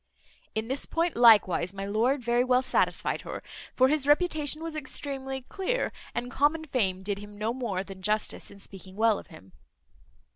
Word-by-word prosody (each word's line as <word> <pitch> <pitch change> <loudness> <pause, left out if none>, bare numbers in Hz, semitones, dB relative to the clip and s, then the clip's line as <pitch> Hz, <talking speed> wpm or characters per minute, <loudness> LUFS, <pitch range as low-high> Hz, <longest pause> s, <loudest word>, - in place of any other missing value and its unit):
In 220 +1 -2
this 265 +3 -2
point 335 +1 0
likewise 210 -5 +5
my 195 0 -4
lord 240 +7 +1
very 240 +1 +2
well 255 0 +3
satisfied 255 - +1
her; - - -7 0.3
for 260 - +5
his 290 0 +1
reputation 305 -1 +3
was 330 -1 -5
extremely 270 -2 -4
clear, 400 - -2 0.2
and 245 +1 -3
common 300 +4 +2
fame 195 -10 0
did 200 0 -2
him 205 0 -11
no 215 +2 -1
more 220 -7 -2
than 195 -1 -11
justice, 210 +2 -1
in 200 - -13
speaking 195 -1 -9
well 220 0 +3
of - - -13
him. 155 - -15
240 Hz, 175 wpm, -28 LUFS, 200-280 Hz, 0.3 s, likewise